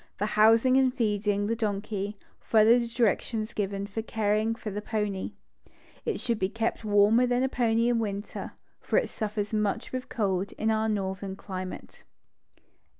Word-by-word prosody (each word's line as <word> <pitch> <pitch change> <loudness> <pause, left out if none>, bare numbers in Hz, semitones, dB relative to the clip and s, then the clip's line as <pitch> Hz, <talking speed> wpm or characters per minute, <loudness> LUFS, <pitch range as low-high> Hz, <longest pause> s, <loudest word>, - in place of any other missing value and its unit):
For 205 - 0
housing 225 +5 +5
and 260 -1 +4
feeding 205 -4 0
the 230 +2 0
donkey, 205 -2 -3 0.2
follow 225 +2 +5
the 235 - -2
directions 230 -1 0
given 200 -1 -2
for 205 +2 -4
caring 220 0 0
for 220 -2 -6
the 205 +2 -4
pony. 210 -2 -2 0.7
It - - -1
should 235 -3 -1
be 190 - +1
kept 225 +2 -2
warmer 210 +4 +4
than 245 0 +1
the - - +3
pony 230 -2 +2
in 240 -1 +2
winter, 205 -2 -4 0.3
for - - 0
it - - +1
suffers 210 0 -3
much 210 -2 -1
with 255 0 -5
cold 195 -4 -1
in 220 +1 0
our 220 0 +1
northern 195 -1 -2
climate. 185 -1 -7
215 Hz, 160 wpm, -28 LUFS, 205-230 Hz, 0.7 s, housing